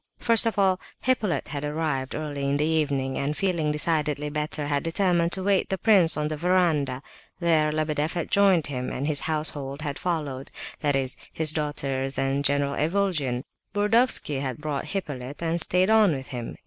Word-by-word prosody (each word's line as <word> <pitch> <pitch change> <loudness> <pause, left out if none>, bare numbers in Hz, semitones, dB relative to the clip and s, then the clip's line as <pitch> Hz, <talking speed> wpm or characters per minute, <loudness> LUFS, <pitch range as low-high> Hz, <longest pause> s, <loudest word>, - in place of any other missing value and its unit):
First 230 -1 +5
of 225 - -2
all 190 -2 +3 0.2
Hippolyte 225 -8 0
had 145 -1 -4
arrived, 150 -3 -2
early 145 -2 -3
in 140 - +1
the 150 - +1
evening, 145 -4 0
and 145 +2 -2
feeling 170 -6 0
decidedly 150 -1 0
better, 150 0 -2
had 145 -1 0
determined 170 0 +1
to 190 - -2
await 195 0 +1
the 190 - -1
prince 190 -7 +4
on 150 0 0
the 155 - -3
verandah. 155 -6 +1 0.4
There 160 -3 +2
Lebedeff 155 0 -1
had 170 -2 -4
joined 195 -5 +4
him, 125 -3 -4
and 135 - -4
his 150 -2 +3
household 150 -2 -1
had 145 -2 -4
followed—that 145 -3 -3
is, 130 -1 -1
his 160 -1 +4
daughters 140 -3 -2
and 135 +1 0
General 140 0 +1
Ivolgin. 155 -7 0 0.3
Burdovsky 210 - +2
had 130 -3 -3
brought 150 -2 -4
Hippolyte, 145 -6 -4
and 165 +1 0
stayed 185 +5 +2
on 215 -6 +5
with 135 -1 -6
him. 120 -4 -6
150 Hz, 175 wpm, -25 LUFS, 140-175 Hz, 0.4 s, First